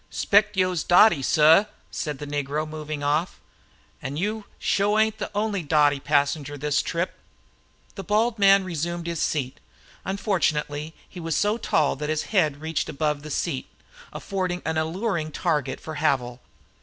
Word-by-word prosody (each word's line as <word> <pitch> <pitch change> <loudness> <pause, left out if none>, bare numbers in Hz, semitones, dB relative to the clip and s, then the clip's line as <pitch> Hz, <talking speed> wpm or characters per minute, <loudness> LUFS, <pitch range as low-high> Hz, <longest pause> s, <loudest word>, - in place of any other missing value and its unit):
"Spect 210 0 +2
yo'se 185 -3 +1
dotty, 175 -3 +5
suh!" 160 +7 +5 0.3
said 150 -2 -4
the 145 - -7
negro, 145 +1 -2
moving 155 -1 -6
off. 150 +5 0 0.6
"An' 135 +3 -5
yo 210 +4 -2
sho 205 +2 +1
ain't 220 0 +2
the - - -3
only 205 -2 0
dotty 145 -2 +3
passenger 145 0 0
this 145 0 0
trip." 170 +2 -3 0.7
The 195 - -7
bald 215 +5 +2
headed 215 - -20
man 195 0 +6
resumed 170 -1 -3
his 170 -2 -3
seat. 135 -4 -2 0.4
Unfortunately 160 -6 -1
he 180 - -11
was 165 -2 -2
so 210 +3 +1
tall 155 -8 +1
that 150 +2 -4
his 155 -1 0
head 155 -7 +2
reached 160 0 -2
above 150 -1 -1
the 155 - -9
seat, 145 -2 -2 0.4
affording 185 -2 -3
a 160 - 0
most 160 - 0
alluring 165 -2 -2
target 150 -7 -1
for 155 -1 -7
Havil. 130 -5 0
160 Hz, 160 wpm, -24 LUFS, 150-195 Hz, 0.7 s, man